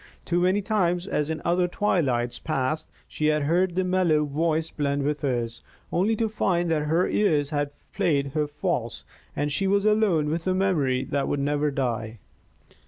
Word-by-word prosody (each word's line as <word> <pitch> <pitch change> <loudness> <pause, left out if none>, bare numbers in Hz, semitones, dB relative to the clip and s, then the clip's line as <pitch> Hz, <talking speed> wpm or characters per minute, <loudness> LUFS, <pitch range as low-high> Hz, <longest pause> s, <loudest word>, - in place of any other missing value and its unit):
Too 175 0 +1
many 185 +3 +2
times, 180 -4 +1
as 150 -6 -1
in 160 -1 -4
other 175 +1 +2
twilights 140 - 0
past, 155 +1 -2 0.2
she 155 - -1
had 150 -1 +2
heard 175 +4 +1
that 185 - +1
mellow 180 -5 +2
voice 160 +2 -1
blend 140 -1 -1
with 150 +1 -1
hers, 120 -4 -2 0.3
only 205 +6 +2
to 225 +1 0
find 175 -5 0
that 150 -2 0
her 165 +4 +2
ears 150 -8 +1
had 145 -1 0 0.2
played 140 -4 +1
her 150 -1 0
false 125 - -3 0.3
and 145 0 -1
she 190 +7 0
was 200 +1 +2
alone 210 -8 +3
with 165 +2 -3
a 185 - +2
memory 150 -10 +1
that 140 +1 -1
would 145 - -1
never 145 +1 +1
die. 120 -5 -2
155 Hz, 175 wpm, -25 LUFS, 140-180 Hz, 0.3 s, alone